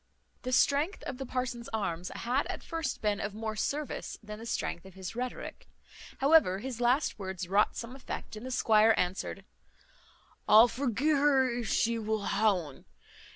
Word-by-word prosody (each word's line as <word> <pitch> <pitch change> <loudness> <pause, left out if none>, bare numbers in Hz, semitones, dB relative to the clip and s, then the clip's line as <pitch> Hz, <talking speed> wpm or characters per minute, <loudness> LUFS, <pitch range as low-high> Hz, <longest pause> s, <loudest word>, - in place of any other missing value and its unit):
The 255 - -4
strength 290 +8 +2
of 260 - -6
the 270 - -5
parson's 245 -2 -3
arms 180 -5 -2
had 250 +4 0
at - - -5
first 325 -8 -4
been 210 -1 +1
of 200 0 -4
more 220 0 -4
service 285 +7 -3
than 210 0 -8
the 230 - -8
strength 175 - -2
of 190 -1 -14
his 190 +3 -7
rhetoric. 250 +1 -5 0.5
However, 275 - +5
his 245 +2 -6
last 245 +1 +2
words 190 -2 -5
wrought 200 +3 +2
some 240 +2 -6
effect, 260 -4 -7
and 215 - -8
the 260 - -5
squire 220 -3 +4
answered, 185 +2 -2 1.0
"I'll 220 +3 +9
forgee 255 +3 -1
her 275 -2 +4
if 235 -4 -3
she 230 0 +1
wull 215 -1 -2
ha 215 +2 +3
un. 165 -8 -5
230 Hz, 170 wpm, -30 LUFS, 205-260 Hz, 1.0 s, I'll